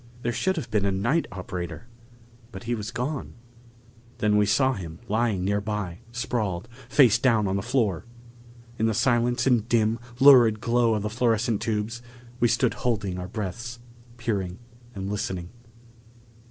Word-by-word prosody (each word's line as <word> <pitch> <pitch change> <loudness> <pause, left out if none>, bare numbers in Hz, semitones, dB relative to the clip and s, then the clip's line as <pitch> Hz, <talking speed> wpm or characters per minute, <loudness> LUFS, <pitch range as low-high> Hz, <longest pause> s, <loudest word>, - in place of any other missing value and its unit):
There 120 - 0
should 190 +9 0
have 135 -9 -5
been 105 -2 +2
a 100 - +1
night 120 +13 +1
operator, 90 0 -6 0.7
but - - -9
he 120 +1 -2
was 110 -2 -4
gone. 125 +5 -4 0.8
Than 105 -1 +2
we 105 -1 +4
saw 130 +5 +3
him 85 -7 -7
lying 110 -4 0
nearby, 100 -2 -2
sprawled, 110 -5 -2 0.2
face 125 -4 +5
down 115 -5 +3
on 95 - 0
the 100 - 0
floor! 115 -6 0 0.7
In 110 - +2
the 110 - 0
silence 120 +1 +2
and 120 -4 +2
dim, 115 -1 +2 0.2
lurid 125 -6 +7
glow 115 0 +2
of 105 - -2
the 105 - -1
fluorescent 115 -1 +1
tubes, 110 +1 -2 0.4
we 120 - +4
stood 115 +1 +2
holding 100 -6 -2
our 90 - -5
breaths, 115 +4 -5 0.4
peering 100 -6 -2 0.4
and 95 -1 -4
listening. 95 -3 -3
110 Hz, 155 wpm, -26 LUFS, 100-120 Hz, 0.8 s, lurid